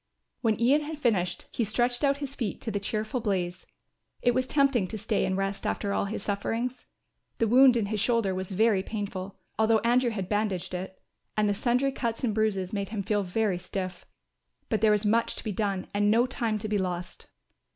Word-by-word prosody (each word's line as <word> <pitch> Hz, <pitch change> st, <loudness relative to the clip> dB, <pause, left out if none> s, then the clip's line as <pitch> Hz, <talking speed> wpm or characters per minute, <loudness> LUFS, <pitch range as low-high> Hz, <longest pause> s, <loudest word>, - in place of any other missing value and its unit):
When 220 Hz, -3 st, +1 dB
Ian 265 Hz, +6 st, +4 dB
had 305 Hz, +1 st, -5 dB
finished 210 Hz, -11 st, 0 dB
he 235 Hz, -, 0 dB
stretched 240 Hz, +4 st, 0 dB
out 280 Hz, 0 st, +3 dB
his 280 Hz, -2 st, -5 dB
feet 230 Hz, -8 st, -3 dB
to 225 Hz, -, -3 dB
the 205 Hz, -, -1 dB
cheerful 215 Hz, +4 st, -2 dB
blaze. 180 Hz, -5 st, -2 dB, 0.6 s
It 245 Hz, -, +4 dB
was 255 Hz, +1 st, 0 dB
tempting 275 Hz, -9 st, +3 dB
to 220 Hz, -, -5 dB
stay 215 Hz, 0 st, 0 dB
and 185 Hz, -, -1 dB
rest 195 Hz, 0 st, -2 dB
after 200 Hz, -1 st, -1 dB
all -, -, +1 dB
his 200 Hz, 0 st, -4 dB
sufferings. 235 Hz, +5 st, -2 dB, 0.5 s
The 230 Hz, -, +2 dB
wound 255 Hz, +2 st, +7 dB
in 220 Hz, -, +1 dB
his 210 Hz, +1 st, -2 dB
shoulder 225 Hz, -3 st, +2 dB
was 185 Hz, 0 st, -4 dB
very 205 Hz, 0 st, +3 dB
painful, 200 Hz, -2 st, -5 dB, 0.2 s
although 220 Hz, 0 st, +5 dB
Andrew 240 Hz, +2 st, +3 dB
had 195 Hz, -5 st, -3 dB
bandaged 205 Hz, -3 st, -1 dB
it, 190 Hz, +1 st, -5 dB, 0.4 s
and 210 Hz, 0 st, +3 dB
the 205 Hz, -, +2 dB
sundry 250 Hz, +6 st, +1 dB
cuts 235 Hz, -3 st, -3 dB
and 230 Hz, -4 st, +1 dB
bruises 205 Hz, -3 st, 0 dB
made 200 Hz, -2 st, -2 dB
him 210 Hz, -2 st, -3 dB
feel 205 Hz, +1 st, +1 dB
very 195 Hz, 0 st, 0 dB
stiff. 185 Hz, 0 st, -5 dB, 0.6 s
But 220 Hz, -2 st, 0 dB
there 220 Hz, -, +5 dB
was 210 Hz, 0 st, +2 dB
much 230 Hz, +3 st, +2 dB
to -, -, -4 dB
be 215 Hz, -, -2 dB
done 200 Hz, -2 st, -1 dB
and 205 Hz, 0 st, +2 dB
no 230 Hz, +3 st, +4 dB
time 235 Hz, -4 st, -1 dB
to 215 Hz, -, -4 dB
be 210 Hz, -1 st, 0 dB
lost. 180 Hz, -1 st, -4 dB
215 Hz, 205 wpm, -28 LUFS, 195-235 Hz, 0.6 s, wound